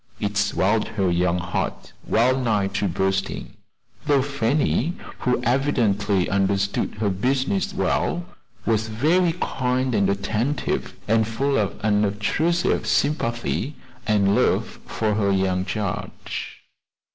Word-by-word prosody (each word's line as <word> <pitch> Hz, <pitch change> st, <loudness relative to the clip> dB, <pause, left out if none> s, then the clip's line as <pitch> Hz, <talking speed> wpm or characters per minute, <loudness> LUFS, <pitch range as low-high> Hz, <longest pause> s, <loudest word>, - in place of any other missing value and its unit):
It 105 Hz, 0 st, -2 dB
swelled 105 Hz, +1 st, +1 dB
her 95 Hz, -3 st, +2 dB
young 90 Hz, 0 st, +2 dB
heart 90 Hz, +1 st, -3 dB
wellnigh 115 Hz, -4 st, +2 dB
to 100 Hz, -, 0 dB
bursting, 95 Hz, +2 st, -1 dB, 0.5 s
though 140 Hz, -3 st, +4 dB
Fanny, 140 Hz, +3 st, +1 dB, 0.3 s
who 125 Hz, -1 st, +1 dB
evidently 110 Hz, -8 st, +1 dB
understood 100 Hz, 0 st, 0 dB
her 105 Hz, -1 st, 0 dB
business 135 Hz, -, 0 dB
well, 175 Hz, -2 st, 0 dB, 0.4 s
was 110 Hz, -1 st, +1 dB
very 160 Hz, +10 st, +2 dB
kind 130 Hz, 0 st, 0 dB
and 100 Hz, -3 st, +2 dB
attentive, 110 Hz, +7 st, -1 dB
and 110 Hz, 0 st, +3 dB
full 135 Hz, +5 st, 0 dB
of 100 Hz, -5 st, 0 dB
unobtrusive 105 Hz, -, +1 dB
sympathy 140 Hz, -1 st, 0 dB, 0.3 s
and 100 Hz, -2 st, +3 dB
love -, -, +1 dB
for 110 Hz, -1 st, 0 dB
her 100 Hz, -1 st, +1 dB
young 95 Hz, -1 st, +1 dB
charge. 100 Hz, -1 st, -5 dB
110 Hz, 110 wpm, -23 LUFS, 100-130 Hz, 0.5 s, though